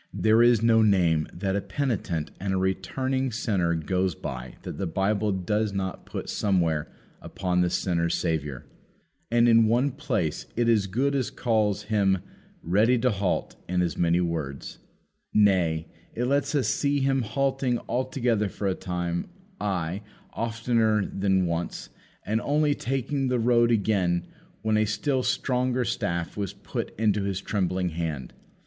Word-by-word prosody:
There 110 Hz, +1 st, +3 dB
is 120 Hz, -2 st, +5 dB
no 115 Hz, -1 st, +5 dB
name 90 Hz, -7 st, +3 dB
that 95 Hz, +2 st, -2 dB
a 100 Hz, -, 0 dB
penitent 100 Hz, -, -2 dB
and 95 Hz, 0 st, -1 dB
a -, -, +1 dB
returning 130 Hz, +8 st, -1 dB
sinner 95 Hz, -7 st, 0 dB
goes 90 Hz, +2 st, 0 dB
by 65 Hz, -2 st, -6 dB
that -, -, -6 dB
the 95 Hz, -, -1 dB
Bible 100 Hz, +4 st, 0 dB
does 105 Hz, +3 st, -1 dB
not 95 Hz, -2 st, -4 dB
put -, -, -5 dB
somewhere 85 Hz, -7 st, +1 dB, 0.3 s
upon 90 Hz, -1 st, -1 dB
the 90 Hz, -, +2 dB
sinner's 85 Hz, -2 st, 0 dB
Saviour. 75 Hz, -5 st, -2 dB, 0.6 s
And 120 Hz, +1 st, +4 dB
in 115 Hz, -1 st, +6 dB
one 125 Hz, +5 st, +2 dB
place 120 Hz, -, -2 dB
it 120 Hz, 0 st, +1 dB
as 110 Hz, -4 st, +3 dB
good 130 Hz, +9 st, 0 dB
as 135 Hz, -4 st, 0 dB
calls 105 Hz, -4 st, 0 dB
Him 100 Hz, -2 st, +2 dB, 0.5 s
Ready 105 Hz, +9 st, +3 dB
to 125 Hz, +1 st, +2 dB
halt 100 Hz, -3 st, -1 dB
in 90 Hz, 0 st, +1 dB
as 85 Hz, -4 st, -1 dB
many 85 Hz, 0 st, +2 dB
words. 80 Hz, -6 st, -3 dB, 0.6 s
Nay, 90 Hz, -6 st, +3 dB, 0.3 s
it 120 Hz, -, 0 dB
lets 140 Hz, +2 st, +1 dB
us 140 Hz, -, +2 dB
see 140 Hz, -1 st, +1 dB
Him 135 Hz, 0 st, +2 dB
halting 130 Hz, +2 st, 0 dB
altogether 125 Hz, -5 st, 0 dB
for 100 Hz, -, -3 dB
a 95 Hz, -, +2 dB
time; 90 Hz, -2 st, -3 dB, 0.3 s
ay, 95 Hz, -1 st, -2 dB, 0.3 s
oftener 115 Hz, -2 st, +1 dB
than 95 Hz, -1 st, +1 dB
once; 85 Hz, 0 st, -3 dB, 0.4 s
and 110 Hz, +2 st, 0 dB
only 150 Hz, 0 st, +2 dB
taking 135 Hz, +1 st, -1 dB
the 125 Hz, 0 st, +1 dB
road 120 Hz, 0 st, +3 dB
again, 100 Hz, -6 st, +1 dB, 0.4 s
when 110 Hz, -1 st, +2 dB
a 110 Hz, -, +3 dB
still 130 Hz, +6 st, 0 dB
stronger 125 Hz, -1 st, 0 dB
staff 85 Hz, -5 st, -2 dB
was 100 Hz, -3 st, -3 dB
put -, -, -5 dB
into 105 Hz, -2 st, +2 dB
his 100 Hz, -1 st, -2 dB
trembling 95 Hz, -2 st, -1 dB
hand. 80 Hz, -6 st, -4 dB
105 Hz, 155 wpm, -26 LUFS, 90-120 Hz, 0.6 s, in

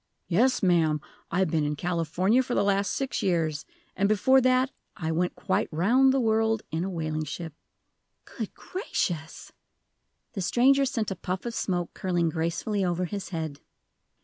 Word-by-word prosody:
"Yes, 225 Hz, +9 st, +2 dB
ma'am. 165 Hz, -4 st, +3 dB, 0.3 s
I've 185 Hz, -4 st, +1 dB
been 155 Hz, -2 st, +1 dB
in 150 Hz, 0 st, -1 dB
California 180 Hz, -, +1 dB
for 255 Hz, -1 st, -3 dB
the -, -, +3 dB
last 200 Hz, -1 st, +1 dB
six 270 Hz, -1 st, -2 dB
years. 160 Hz, -5 st, 0 dB, 0.3 s
And 200 Hz, +2 st, +2 dB
before 260 Hz, +6 st, +4 dB
that 255 Hz, +1 st, +3 dB, 0.3 s
I 160 Hz, -1 st, -2 dB
went 175 Hz, +2 st, 0 dB
quite -, -, 0 dB
round 235 Hz, +12 st, +4 dB
the 270 Hz, -, +2 dB
world 225 Hz, -1 st, +2 dB
in 160 Hz, +2 st, -1 dB
a 190 Hz, -, -2 dB
whaling 155 Hz, -3 st, -2 dB
ship!" 160 Hz, +1 st, -6 dB, 0.7 s
"Good -, -, -6 dB
gracious!" 170 Hz, -, -4 dB, 0.8 s
The 195 Hz, -, -3 dB
stranger 270 Hz, +8 st, +4 dB
sent 230 Hz, -6 st, -2 dB
a -, -, -2 dB
puff 185 Hz, +3 st, -4 dB
of 235 Hz, -, -3 dB
smoke 175 Hz, -5 st, -2 dB
curling 175 Hz, -3 st, 0 dB
gracefully 170 Hz, +6 st, -1 dB
over 180 Hz, 0 st, 0 dB
his 195 Hz, 0 st, -5 dB
head. 160 Hz, -5 st, -4 dB
185 Hz, 160 wpm, -27 LUFS, 165-225 Hz, 0.8 s, before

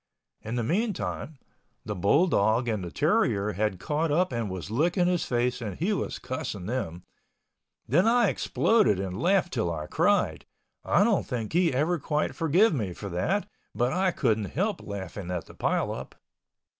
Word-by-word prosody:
In 110 Hz, +2 st, -5 dB
the 120 Hz, -, 0 dB
meantime, 175 Hz, -, -2 dB, 0.5 s
the 105 Hz, -, -3 dB
bull 100 Hz, -, +3 dB
dog 115 Hz, -, +2 dB
and 110 Hz, -5 st, -1 dB
the 85 Hz, -, -5 dB
terrier 100 Hz, +6 st, +1 dB
had 105 Hz, -1 st, -1 dB
caught 155 Hz, -, -1 dB
up 175 Hz, +5 st, +2 dB
and 115 Hz, -4 st, -2 dB
was 95 Hz, +1 st, -6 dB
licking 175 Hz, -, +2 dB
his 180 Hz, -1 st, +1 dB
face 125 Hz, 0 st, 0 dB
and 105 Hz, -5 st, -5 dB
he 190 Hz, +7 st, 0 dB
was 200 Hz, -, -3 dB
cussing 105 Hz, -7 st, -5 dB
them. 90 Hz, -8 st, -3 dB, 0.8 s
Then 175 Hz, -, +3 dB
I 235 Hz, -2 st, +4 dB
exploded 215 Hz, -, +2 dB
and 95 Hz, 0 st, -4 dB
laughed 185 Hz, -1 st, +2 dB
'til 110 Hz, -9 st, 0 dB
I 75 Hz, -2 st, -4 dB
cried—I -, -, 0 dB
don't -, -, +1 dB
think 115 Hz, -1 st, -4 dB
he 175 Hz, 0 st, +3 dB
ever 155 Hz, +6 st, +1 dB
quite 150 Hz, +1 st, -1 dB
forgive 175 Hz, +7 st, +3 dB
me 105 Hz, -, -2 dB
for 100 Hz, +3 st, -7 dB
that 175 Hz, -, -1 dB, 0.3 s
but 125 Hz, +2 st, +1 dB
I 185 Hz, +1 st, +2 dB
couldn't 110 Hz, -, 0 dB
help 195 Hz, -, -2 dB
laughing 100 Hz, -2 st, -6 dB
at 90 Hz, -3 st, -3 dB
the -, -, -14 dB
pile -, -, 0 dB
up. -, -, -7 dB
125 Hz, 170 wpm, -27 LUFS, -, 0.8 s, I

